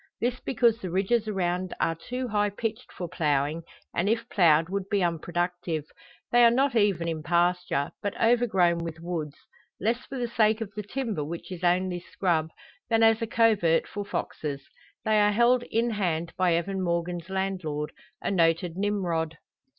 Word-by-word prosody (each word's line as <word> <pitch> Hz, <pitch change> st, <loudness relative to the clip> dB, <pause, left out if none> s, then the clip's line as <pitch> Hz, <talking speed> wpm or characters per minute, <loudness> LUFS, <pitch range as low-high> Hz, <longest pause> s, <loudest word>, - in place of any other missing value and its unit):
This 245 Hz, +1 st, -1 dB
because 235 Hz, -2 st, +2 dB
the 185 Hz, -, -4 dB
ridges 205 Hz, +5 st, +1 dB
around 185 Hz, -2 st, -1 dB
are 165 Hz, -, +2 dB
too 250 Hz, +10 st, -5 dB
high 205 Hz, -1 st, +2 dB
pitched 225 Hz, +4 st, -4 dB
for 175 Hz, -, -5 dB
ploughing, 150 Hz, 0 st, 0 dB, 0.3 s
and 185 Hz, +4 st, +1 dB
if 230 Hz, +1 st, 0 dB
ploughed 165 Hz, -4 st, +4 dB
would 195 Hz, +1 st, -3 dB
be 200 Hz, -2 st, +2 dB
unproductive. 175 Hz, -1 st, -2 dB, 0.5 s
They 240 Hz, 0 st, +6 dB
are 235 Hz, -, +8 dB
not 265 Hz, +2 st, +2 dB
even 200 Hz, -6 st, +2 dB
in 160 Hz, -2 st, -2 dB
pasture, 175 Hz, -2 st, +1 dB
but 205 Hz, -, -3 dB
overgrown 210 Hz, -8 st, +3 dB
with 165 Hz, -1 st, -5 dB
woods; 165 Hz, -4 st, -4 dB, 0.4 s
less 235 Hz, +5 st, 0 dB
for 270 Hz, -, -6 dB
the 245 Hz, -1 st, -1 dB
sake 220 Hz, -1 st, +2 dB
of 210 Hz, -3 st, -5 dB
the 210 Hz, -, -4 dB
timber, 215 Hz, -, -3 dB
which 165 Hz, +5 st, -7 dB
is 180 Hz, -1 st, -7 dB
only 180 Hz, 0 st, +2 dB
scrub, 170 Hz, -3 st, -1 dB, 0.4 s
than 225 Hz, -1 st, +3 dB
as 225 Hz, 0 st, +5 dB
a 230 Hz, -, -1 dB
covert 215 Hz, -8 st, +3 dB
for 205 Hz, -, -5 dB
foxes. 150 Hz, -7 st, -4 dB, 0.4 s
They 215 Hz, -1 st, +3 dB
are 205 Hz, 0 st, +4 dB
held 240 Hz, +3 st, +4 dB
in 230 Hz, +1 st, +1 dB
hand 170 Hz, -5 st, -1 dB
by 180 Hz, -2 st, +3 dB
Evan 190 Hz, +3 st, -1 dB
Morgan's 170 Hz, 0 st, -2 dB
landlord 185 Hz, -6 st, -2 dB, 0.3 s
a -, -, 0 dB
noted 165 Hz, -1 st, +2 dB
Nimrod. 175 Hz, -6 st, -1 dB
185 Hz, 170 wpm, -27 LUFS, 170-220 Hz, 0.5 s, are